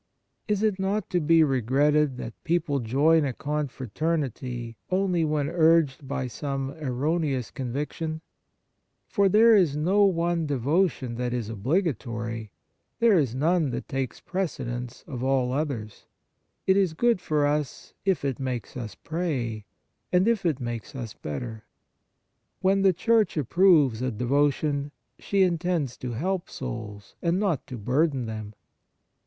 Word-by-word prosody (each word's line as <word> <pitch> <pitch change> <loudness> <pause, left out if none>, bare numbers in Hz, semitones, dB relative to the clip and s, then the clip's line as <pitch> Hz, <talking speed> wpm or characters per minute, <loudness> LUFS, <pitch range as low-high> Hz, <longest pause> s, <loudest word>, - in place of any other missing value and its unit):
Is 210 0 0
it 210 -3 +1
not 195 +1 -1
to 180 - +2
be 165 0 +5
regretted 140 +2 +2
that 115 - -6
people 160 -4 0
join 145 +7 +3
a 135 -3 -1
con 150 +3 -2
fraternity 130 -3 -3
only 185 -2 +1
when 150 -2 0
urged 160 -4 +3
by 140 -1 -2
some 135 +1 -3
erroneous 140 -1 -1
conviction? 150 +5 -4 0.9
For 200 -3 +3
there 225 +3 +6
is 170 -8 +3
no 190 +7 +3
one 170 -3 +1
devotion 140 -2 0
that 125 0 -1
is 115 -3 -3
obligatory; 115 - -2 0.5
there 225 -6 +5
is 130 -5 0
none 160 +2 +2
that 125 - -4
takes 135 -4 -3
precedence 125 -10 -4
of 125 -2 -6
all 130 -1 +1
others; 130 -8 -4 0.6
it 190 - +4
is 190 -5 +2
good 235 +1 +2
for 150 -4 +1
us, 145 -1 -2
if 190 -7 +1
it 135 -3 -1
makes 125 -5 -4
us 115 -6 -6
pray, 130 - -3 0.5
and 180 +3 +3
if 215 -6 +2
it 150 -5 0
makes 120 +2 -5
us 115 -5 -5
better. 110 - -6 1.0
When 195 +1 +3
the 195 -1 +5
Church 220 +2 +2
approves 150 - +4
a 130 - 0
devotion, 140 +4 0 0.3
she 200 -1 +2
intends 170 -7 0
to 125 -2 -5
help 180 +9 -2
souls, 110 -6 -7
and 170 +2 +1
not 190 -11 0
to 130 -3 -6
burden 130 +4 +1
them. 110 -1 -6
145 Hz, 140 wpm, -26 LUFS, 125-175 Hz, 1.0 s, there